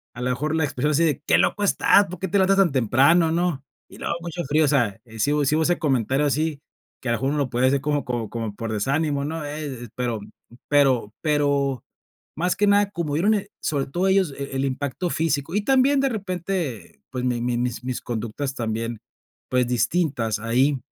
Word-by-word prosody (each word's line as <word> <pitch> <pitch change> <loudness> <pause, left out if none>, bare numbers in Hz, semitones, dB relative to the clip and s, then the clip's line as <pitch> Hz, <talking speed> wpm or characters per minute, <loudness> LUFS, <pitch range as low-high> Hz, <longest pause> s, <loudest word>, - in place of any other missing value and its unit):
a 125 - -7
lo 125 - -1
mejor 150 +5 -1
la 160 - +1
expresión 145 +1 0
así 155 +3 +2
de: 150 -4 +1
"Qué - - +4
loco 205 - +1
estás, 200 0 +4
¿por 180 0 -8
qué 190 - -2
te 200 - +2
levantas 195 +1 +3
tan 190 -6 +4
temprano?", 140 +7 +4
¿no? 165 -5 -1 0.2
Y - - -13
luego - - -2
mucho 170 0 -4
frío, 150 +3 +2
o - - +1
sea, 120 -9 +1 0.2
sí 145 +7 +1
hu 150 - +2
sí 150 - +2
hubo 160 - +2
ese 175 +2 +2
comentario 135 -2 +1
así, 150 +1 -1 0.4
que 130 - -3
a - - +2
lo 115 - +1
mejor 135 - -1
uno 150 - -1
lo 140 -3 0
puede 125 +1 +2
hacer 135 +1 +2
como 145 0 -1
como 120 -4 -3
como 115 -3 -4
por 115 0 -4
desánimo, 140 +6 0
¿no? 160 +1 -4
Eh, 145 -5 -6
pero 120 -3 -2 0.5
pero 130 -7 +3
pero 140 -3 +1 0.5
más 180 +3 0
que 205 - +2
nada 205 0 +4
como 170 -6 -3
vieron, 195 +9 +3
eh, 205 0 -3
sobre 140 -3 -1
todo 175 +7 0
ellos 190 -6 +2
el 140 0 -5
el 135 0 -1
impacto 140 +6 -2
físico 155 -1 -1
y 210 - +2
también 270 +3 +3
de 275 - +2
repente, 180 - -4
pues, 125 -1 -3
mi 120 -2 0
mi 120 0 0
mis 120 0 -2
mis 130 -1 -3
conductas 120 +4 -4
también, 115 -1 -3 0.5
pues, 125 -1 +2
distintas 125 -3 0
ahí, 130 +5 +1
145 Hz, 215 wpm, -23 LUFS, 125-165 Hz, 0.5 s, Qué